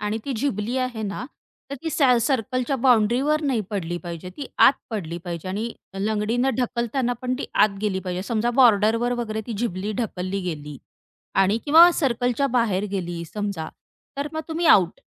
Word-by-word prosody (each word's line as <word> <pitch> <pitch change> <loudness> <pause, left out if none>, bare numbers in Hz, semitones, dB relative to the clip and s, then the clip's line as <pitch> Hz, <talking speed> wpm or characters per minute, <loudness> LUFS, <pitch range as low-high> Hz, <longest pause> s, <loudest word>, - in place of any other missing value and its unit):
आणि 210 +1 -2
ती 275 - -2
झिबली 235 -1 -2
आहे 250 -4 -2
ना, 205 +4 -4 0.5
तर - - -3
ती 325 - -2
सॅ 270 -4 +4
सर्कलच्या 255 +1 0
बाउंड्रीवर 250 +5 +3
नाही 260 -6 +1
पडली 175 -4 -3
पाहिजे, 175 0 -7
ती 280 - -5
आत - - +8 0.2
पडली 175 -6 -4
पाहिजे 170 +1 -5
आणि 215 +5 -3 0.3
लंगडीने 220 +5 0
ढकलताना 245 +1 -1
पण 255 0 -1
ती - - -4
आत 200 -2 +3
गेली 190 -3 0
पाहिजे. 180 0 -4
समजा 230 +3 0
बॉर्डरवर 230 +1 +4
वगैरे 220 -1 -4
ती 235 - -4
झिबली 210 -2 -2
ढकलली 195 -2 -3
गेली 150 -5 -5 0.7
आणि 200 +4 +2
किंवा 330 +4 +8
सर्कलच्या 250 -2 0
बाहेर 230 -6 +1
गेली 175 -3 -4
समजा, 200 -6 -3 0.5
तर 285 +1 -2
मग 315 - -2
तुम्ही 330 +1 -1
आउट. 185 - +4
220 Hz, 165 wpm, -23 LUFS, 195-255 Hz, 0.7 s, आत